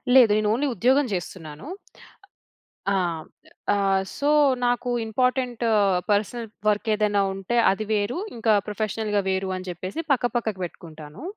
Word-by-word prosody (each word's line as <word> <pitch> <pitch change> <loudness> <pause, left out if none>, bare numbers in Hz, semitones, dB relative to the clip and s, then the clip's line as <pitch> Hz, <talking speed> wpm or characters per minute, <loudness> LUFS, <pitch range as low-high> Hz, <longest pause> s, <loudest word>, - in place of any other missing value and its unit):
లేదు. 240 -5 +8
నేను 210 -1 +1
ఓన్లీ 285 +5 0
ఉద్యోగం 260 +7 +3
చేస్తున్నాను. 170 - -6 1.2
ఆ! - - +2 0.8
ఆహ్, 195 -1 +2
సో, 285 - -1 0.4
నాకు 245 +1 0 0.2
ఇంపార్టెంటు, 250 0 0 0.4
పర్సనల్ 220 +3 0 0.2
వర్కేదైనా 210 -1 +2
ఉంటే 195 +5 -3 0.2
అది 215 +2 -3
వేరు, 215 - 0 0.2
ఇంకా 225 -1 +2
ప్రొఫెషనల్‌గా 210 0 -1
వేరు, 190 0 -1
అని 185 0 -8
చెప్పేసి 185 - -5
పక్క 245 -2 +2
పక్కకు 220 -5 -1
పెట్టుకుంటాను. 160 - -9
210 Hz, 120 wpm, -24 LUFS, 190-240 Hz, 1.2 s, లేదు